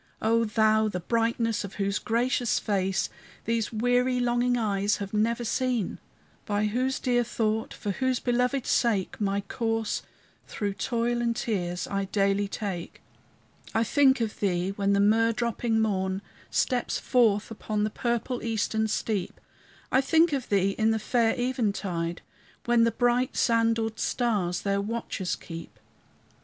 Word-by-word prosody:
O 230 +1 +2
Thou, 220 0 +3
the 185 -4 -3
brightness 230 +2 0
of 200 0 -8
whose 200 0 -1
gracious 240 +1 +1
face 195 -3 0 0.4
These 230 -1 0
weary, 245 +2 +2
longing 245 0 +2
eyes 205 -2 +1
have 200 0 -6
never 230 +3 +1
seen, 250 -3 -1 0.4
By 205 0 0
whose 255 +5 0
dear 245 -2 +2
thought, 220 -1 -1
for 205 - -4
whose 260 +4 0
belovèd 250 +1 0
sake, 215 -4 +1
My 200 0 +1
course, 225 +1 -2 0.5
through 205 -2 -3
toil 235 +3 -1
and 235 -1 0
tears, 180 -6 -2
I 195 0 -1
daily 200 0 +1
take, 195 -4 -5 0.7
I 225 - +3
think 265 +1 +4
of 220 -2 -2
thee 185 -1 0
when 200 0 0
the 200 - +3
myrrh 225 +3 +4
dropping 230 0 0
morn 190 -2 0 0.3
Steps 250 -2 0
forth 225 -4 +2
upon 215 -1 -2
the 215 - 0
purple 240 +2 -2
eastern 220 -1 0
steep; 210 -3 -2 0.5
I 260 - +4
think 320 +3 +3
of 270 -3 -2
thee 195 -1 +2
in 220 0 +3
the 225 - +2
fair 225 +1 +1
eventide, 200 -9 -1 0.4
When 240 -1 +4
the 230 - +2
bright 245 +2 +1
sandaled 225 -1 +1
stars 200 -8 0
their 200 0 +1
watches 205 -4 -3
keep. 165 -1 -10
220 Hz, 145 wpm, -27 LUFS, 200-240 Hz, 0.7 s, think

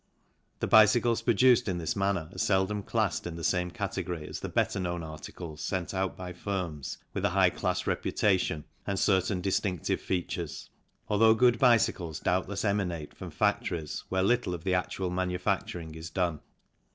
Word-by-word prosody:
The - - 0
bicycles 115 +2 +5
produced 120 +1 +4
in 90 -3 -1
this 80 -3 -2
manner 100 -4 0
are - - -11
seldom 100 0 +1
classed 105 -4 -1
in 85 - -6
the 85 - -7
same 90 +2 +1
category 90 -5 -4
as - - -6
the - - -5
better - - 0
known 85 -2 -2
articles 80 0 -8
sent 90 +3 -2
out 95 0 -1
by 90 -1 -6
firms 90 -6 -4 0.2
with - - -3
a - - +3
high - - +4
class - - -1
reputation 95 -7 +1 0.2
and 100 - -1
certain 95 -1 +2
distinctive 95 -2 -1
features, 85 -3 -3 0.4
although 110 +2 +5
good 120 0 +4
bicycles 100 - +3
doubtless 95 +3 -1
emanate 90 -7 -1
from - - -7
factories 80 -4 -1
where 95 0 +1
little 120 -3 +1
of 80 - -9
the 95 0 0
actual 90 0 -1
manufacturing 90 -2 -2
is 80 +1 -7
done. 85 -3 -1
95 Hz, 165 wpm, -29 LUFS, 85-100 Hz, 0.4 s, bicycles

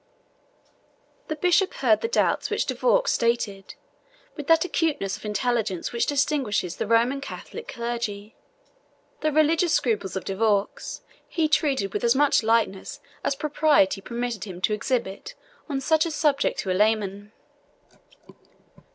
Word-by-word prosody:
The 310 - -3
bishop 360 +4 +2
heard 230 -5 +2
the - - 0
doubts 470 - +1
which - - 0
De - - -2
Vaux - - +2
stated, 230 -5 -1 0.6
with 295 -3 -7
that 325 +1 +4
acuteness 310 - -1
of - - -12
intelligence 210 -3 -1
which 235 - 0
distinguishes 270 - 0
the - - -2
Roman 235 +5 +2
Catholic 460 +10 -8
clergy. 235 -2 -4 0.8
The 310 - 0
religious 315 +2 +3
scruples 210 -7 0
of 190 - -4
De 195 - -3
Vaux 205 -1 -1 0.2
he 325 -3 0
treated 275 -10 +1
with - - -2
as 235 +1 +4
much 290 +1 +4
lightness 220 -4 0 0.2
as 280 - 0
propriety 290 -10 +2
permitted 235 -1 -4
him 185 -3 -8
to 210 - +1
exhibit 210 -3 -3 0.3
on 275 -2 -1
such 315 +4 +2
a - - -2
subject 300 -3 +1
to 190 - -3
a - - +2
layman. 205 0 0
235 Hz, 145 wpm, -25 LUFS, 205-300 Hz, 0.8 s, that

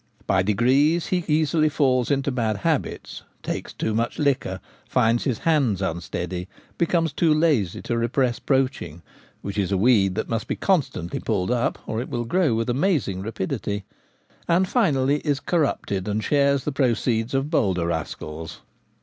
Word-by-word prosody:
By 95 -1 +2
degrees 130 - +3
he 180 -2 0
easily 155 0 +2
falls 130 -5 +1
into 140 0 +1
bad 115 -4 -1
habits, - - -2 0.2
takes - - -4
too 110 - -2
much 115 +2 -1
liquor, 135 -10 0 0.3
finds 120 -2 +2
his 125 -5 0
hands 140 - +1
unsteady, 90 0 -3 0.3
becomes 165 -3 +1
too 165 -1 +2
lazy 150 - +1
to 120 - -2
repress 120 0 0
poaching 130 - -1 0.4
(which 100 +1 -3
is 100 -1 0
a 95 - +2
weed 100 -3 +3
that - - -2
must 115 -1 -2
be - - -1
constantly 140 - 0
pulled 100 -2 -1
up, 125 -1 0
or 110 +1 -2
it 125 - -6
will 120 0 -2
grow 160 -2 +2
with 115 0 -1
amazing 125 - 0
rapidity), 100 -1 -3 0.6
and 180 +3 +3
finally 145 - +2
is 145 -3 -1
corrupted, 140 - -1
and 105 +1 -1
shares 140 -2 +2
the 150 - -2
proceeds 120 -2 0
of 135 +3 -1
bolder 95 - +1
rascals. 80 -1 -5
125 Hz, 160 wpm, -24 LUFS, 100-145 Hz, 0.6 s, degrees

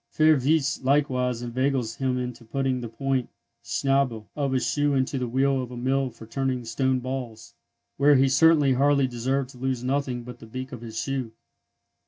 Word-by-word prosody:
Fürwitz 150 -2 +3
likewise 130 -3 +1
inveigles 125 -1 -1
him 130 -2 0
into 125 -1 -5
putting 130 +2 -1
the 120 - -5
point 135 +1 -1 0.3
(schnäbel) 135 -5 0
of 140 -2 -1
his 130 -1 +1
shoe 145 -1 +1
into 130 0 0
the 125 - -2
wheel 135 +2 +1
of 125 - -6
a 125 - -8
mill 130 +2 0
for 115 - -13
turning 130 +1 -2
stone 130 +3 0
balls, 125 -3 -6 0.4
where 145 +1 +5
he 135 +1 +4
certainly 145 0 +5
hardly 140 +1 +3
deserved 130 +2 -2
to 125 - -15
lose 130 -1 -2
nothing 130 -2 -1
but 125 0 -10
the 115 - -12
beak 130 +4 -6
of 125 -3 -8
his 115 -1 -6
shoe. 135 -4 -3
130 Hz, 180 wpm, -25 LUFS, 125-135 Hz, 0.4 s, where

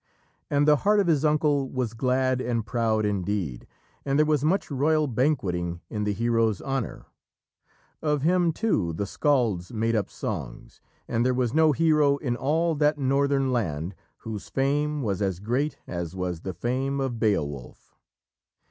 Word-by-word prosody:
And 145 0 +2
the 150 -1 +6
heart 210 +6 +3
of 200 - +3
his 160 -4 +2
uncle 150 -3 +2
was 125 -4 -2
glad 130 +1 +1
and 115 -3 -1
proud 110 -2 0
indeed, 95 -9 -2 0.4
and 140 0 0
there 155 - +4
was 150 -2 +1
much 175 +2 +1
royal 155 +3 +2
banqueting 100 - -1
in 105 -2 -2
the 105 - +1
hero's 115 -1 +1
honour. 135 -4 -4 1.0
Of 150 -3 0
him, 175 +1 +3
too, 130 - 0
the 100 +6 -2
scalds 115 -7 0
made 115 0 0
up 105 -3 0
songs, - - -6 0.3
and 115 - 0
there 125 0 +2
was 125 -2 0
no 160 0 +5
hero 150 -2 +3
in 125 -4 -2
all 160 +7 +1
that 150 0 +2
northern 140 0 +1
land 85 -7 -2 0.2
whose 110 -3 -7
fame 145 +2 0
was 100 -3 -1
as 95 -3 -1
great 125 +8 -1
as 85 0 -5
was 90 -3 -3
the 95 -3 -5
fame 130 +8 -1
of 130 -4 -2
Beowulf. 75 - -2
130 Hz, 160 wpm, -26 LUFS, 105-145 Hz, 1.0 s, the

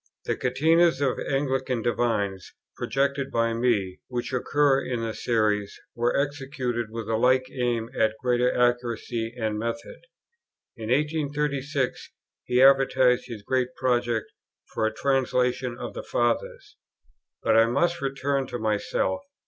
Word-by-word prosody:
The - - 0
Catenas 160 +5 +3
of 135 -3 0
Anglican 130 -3 -1
divines, 105 -6 -1 0.2
projected 140 0 -1
by 115 0 +1
me, 115 -6 0
which 125 +1 -4
occur 140 +1 +2
in 120 -2 -3
the 115 -1 -3
Series 105 -4 0
were 120 +2 +1
executed 135 -4 -2
with 115 -1 -6
a 110 0 0
like 130 +2 +3
aim 120 -3 -1
at 110 0 +2
greater 125 0 +2
accuracy 120 -2 0
and 110 -1 -1
method. 115 +1 -5 0.8
In 110 -2 -7
1836 145 -1 -1 0.4
he 125 +1 +3
advertised 135 -2 +5
his 115 -5 -8
great 130 +2 -1
project 120 -3 0 0.4
for 110 - +1
a - - -1
Translation 125 -1 0
of - - -6
the - - -5
Fathers: 120 -1 -2 0.7
but - - +3
I 115 0 +6
must 170 +8 +1
return 135 0 -1
to - - -4
myself. 110 - -1
125 Hz, 130 wpm, -26 LUFS, 115-135 Hz, 0.8 s, I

